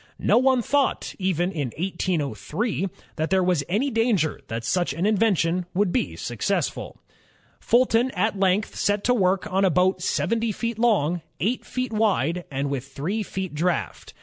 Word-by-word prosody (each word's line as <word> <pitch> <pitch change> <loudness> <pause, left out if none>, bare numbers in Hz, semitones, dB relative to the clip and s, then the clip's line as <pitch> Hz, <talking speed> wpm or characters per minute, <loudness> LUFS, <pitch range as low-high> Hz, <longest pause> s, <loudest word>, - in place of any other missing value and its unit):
No - - +3
one 260 -1 +3
thought, 285 +2 0
even 185 -1 0
in 150 -7 -2
1803, 175 - -2 0.3
that 160 +1 -1
there 190 -1 +3
was 180 -5 +1
any 240 +10 +1
danger 225 -9 +1
that 115 +1 -4
such 175 +3 0
an 165 +6 -1
in 215 +1 +3
vention 185 -4 +1
would 195 -1 +2
be 250 - -1
a - - -13
success. - - -1 0.8
Fulton 240 0 +3
at 215 -2 0
length 195 +2 +1
set 205 0 0
to 250 - +3
work 190 -4 +2
on 195 +1 +3
a 190 - +5
boat 180 +2 +2
seventy 230 +4 0
feet 230 +2 -3
long, 180 -8 +2 0.2
eight 230 +7 0
feet 255 -2 -4
wide, 180 -6 +1
and 140 0 -2
with 135 -1 -3
three 160 +11 -3
feet 190 -3 -4
draft. 155 - -2
190 Hz, 170 wpm, -24 LUFS, 165-225 Hz, 0.8 s, a